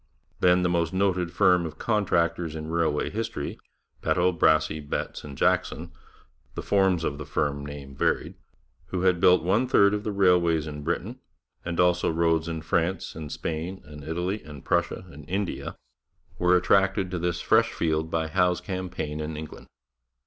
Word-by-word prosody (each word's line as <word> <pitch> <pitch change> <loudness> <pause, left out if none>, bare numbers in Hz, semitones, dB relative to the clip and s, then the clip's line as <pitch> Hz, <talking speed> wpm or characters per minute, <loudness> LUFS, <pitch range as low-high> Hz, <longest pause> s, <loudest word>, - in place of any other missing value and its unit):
Then 90 0 +4
the - - +3
most 85 -1 0
noted 95 -2 +1
firm 90 0 +4
of 80 -2 -6
contractors 85 -7 0
in 80 0 -5
railway 80 -3 0
history, 110 -8 -4 0.4
Peto, 90 +1 +2
Brassey, 80 -1 +3
Betts 75 -1 -4
and 70 -2 -9
Jackson - - 0 0.6
(the - - -4
forms 95 -4 +2
of 70 -2 -2
the 75 - -6
firm 70 -1 -1
name 70 -1 -8
varied), - - 0 0.5
who 90 +2 -3
had 90 -2 +3
built 90 -1 +5
one 105 +9 +2
third 100 -5 +5
of 105 0 -2
the 105 - -2
railways 90 -5 +3
of 75 -1 -7
Britain, 95 - -3 0.4
and 85 0 -4
also 90 0 +3
roads 80 0 +1
in 80 -1 -4
France 85 +3 -1
and 80 -2 -7
Spain 85 +4 -4
and 75 -1 -11
Italy 90 +6 -2
and 75 -3 -11
Prussia 85 0 0
and 75 +1 -13
India, 95 +1 -3 0.6
were 90 0 +4
attracted 95 0 +2
to 90 - -2
this 85 0 -1
fresh - - +3
field 80 -1 -1
by 80 0 0
Howe's 90 +1 +2
campaign 90 -5 -4
in 75 0 -4
England. 80 0 -9
85 Hz, 165 wpm, -26 LUFS, 80-90 Hz, 0.6 s, built